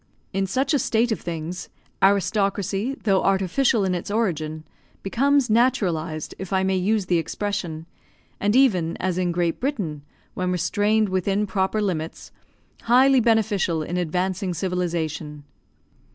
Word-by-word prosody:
In 195 0 0
such 265 - 0
a 290 - +3
state 235 0 +1
of 220 - -1
things, 170 +1 -5 0.3
aristocracy, 200 +3 +1
though 195 -3 +2
artificial 195 +3 +2
in 185 - 0
its 175 +1 -4
origin, 160 -8 -1 0.4
becomes 275 +6 +2
naturalised, 185 - 0
if 190 -1 -7
I 190 -1 +2
may 190 0 +1
use 200 +2 +1
the 175 -2 +2
expression, 165 -2 -3 0.5
and 205 +3 +1
even, 185 -12 +3
as 185 -1 -1
in 180 -1 +1
Great 170 -1 -1
Britain, 200 - -3 0.3
when 185 0 -2
restrained 205 +4 +1
within 195 +2 0
proper 195 +1 0
limits, 165 -5 -4 0.5
highly 260 +3 +5
beneficial 210 -8 +1
in 175 - -4
advancing 180 +2 -1
civilization. 165 -4 -3
190 Hz, 135 wpm, -23 LUFS, 175-215 Hz, 0.5 s, highly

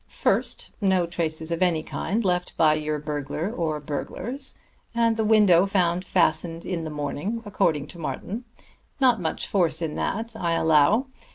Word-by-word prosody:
First: - - 0
no 190 -3 +3
traces 160 -1 -3
of 170 - -2
any 170 -4 +2
kind 215 +6 -2
left 180 -1 0
by 155 -2 +5
your 155 0 -1
burglar 150 +4 -3
or 160 -5 -1
burglars, 225 - -3 0.4
and 230 -1 +3
the 220 - 0
window 205 -4 +5
found 180 -2 +1
fastened 165 -1 +1
in 170 -3 -3
the - - -4
morning 150 +10 -3
according 170 -8 +1
to 170 - -10
Martin. 210 +8 -4 0.6
Not 250 -6 +4
much 160 - -1
force 165 -5 +1
in 160 -3 -2
that, 230 +2 -3
I 170 -5 -1
allow. 160 - +4
170 Hz, 160 wpm, -25 LUFS, 155-205 Hz, 0.6 s, by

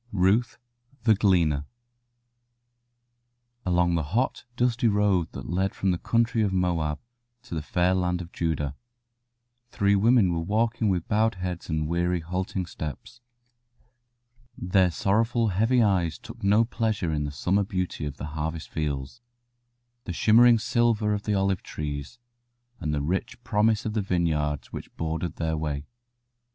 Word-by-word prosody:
RUTH, 105 +4 +2 0.5
THE 110 -2 +5
GLEANER 85 -8 +2 2.0
Along 90 -1 +2
the 85 - +1
hot, 105 - -1
dusty 120 0 +1
road 100 -5 +2
that - - -7
led 95 +3 -1
from 95 - +1
the 90 - -1
country 115 0 +1
of 100 -3 +1
Moab 85 -5 0 0.5
to 120 - -10
the 80 - -2
fair 90 +4 +1
land 90 -1 0
of 85 0 -8
Judah 75 -4 -2 0.9
three 100 -3 +2
women 105 -3 +4
were 85 - -1
walking 110 +4 +1
with 90 -3 -1
bowed 110 0 +2
heads 90 -1 -5
and 80 -1 -1
weary, 85 +2 0
halting 90 +2 -3
steps. 80 - -8 1.4
Their 90 0 +3
sorrowful, 115 +6 +1
heavy 115 +6 +3
eyes 90 -6 +1
took - - -12
no 105 +3 +4
pleasure 110 -7 -1
in 75 -1 -1
the 70 - -4
summer 90 +8 +1
beauty 90 -5 -3
of 75 -1 -5
the - - -5
harvest 80 +1 -4
fields, 70 - -3 0.8
the 90 - -4
shimmering 115 +5 +6
silver 115 -2 +1
of 105 - -2
the 105 - +1
olive 95 -1 +1
trees, 75 - -6 0.6
and 75 - -2
the 75 -1 -1
rich 90 +5 -3
promise 110 +1 +2
of 110 - -2
the 110 - 0
vineyards 80 -6 -1
which - - -8
bordered 80 +1 -3
their 80 -1 -1
way. 75 -2 -3
90 Hz, 145 wpm, -26 LUFS, 80-105 Hz, 2.0 s, shimmering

